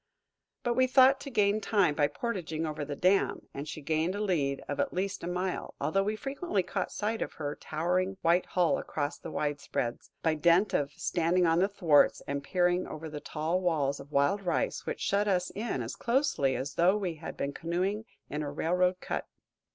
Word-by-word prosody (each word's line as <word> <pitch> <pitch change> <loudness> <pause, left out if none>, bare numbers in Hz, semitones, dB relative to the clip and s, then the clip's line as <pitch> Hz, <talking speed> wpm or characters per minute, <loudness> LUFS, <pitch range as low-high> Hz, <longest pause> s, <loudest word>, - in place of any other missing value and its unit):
But 240 - +1
we 255 +1 +3
thought 265 +1 +6
to 280 - -7
gain 210 -3 +2
time 200 -7 +3
by 145 -1 +3
portaging 165 -7 -3
over 155 -1 -3
the 145 0 -4
dam, 185 +5 +2
and 140 +2 -6
she 155 - -7
gained 160 +5 0
a - - -3
lead 150 -10 0
of 145 - -3
at - - 0
least 190 0 -2
a - - -3
mile, 180 +1 -3
although 195 +5 +1
we 210 +2 -1
frequently 270 - -2
caught 185 +1 -3
sight 220 +2 -2
of - - -3
her 145 -2 -4
towering 185 +4 -1
white 170 +2 +3
hull 175 -3 +2
across 145 0 -3
the - - -7
widespreads, 145 -6 -3
by 160 - +3
dint 170 +6 +3
of 140 -1 +1
standing 175 +1 +1
on 165 0 +3
the 190 - +4
thwarts 175 -8 +3
and 140 0 -3
peering 180 +2 +1
over 155 0 -7
the 150 - -5
tall 165 +4 -1
walls 150 -6 +1
of 140 +1 -11
wild 140 +8 +2
rice 175 -4 -1
which - - -3
shut 205 +1 +1
us 180 -2 +1
in 210 - -3
as 115 - -5
closely 235 - +1
as 140 +2 -3
though 180 +4 +4
we 190 -5 -2
had 155 - -8
been 140 0 -2
canoeing 185 +7 -2 0.2
in 150 +2 -3
a 145 - -3
railroad 180 +4 +1
cut. - - -3
175 Hz, 200 wpm, -30 LUFS, 150-195 Hz, 0.2 s, thought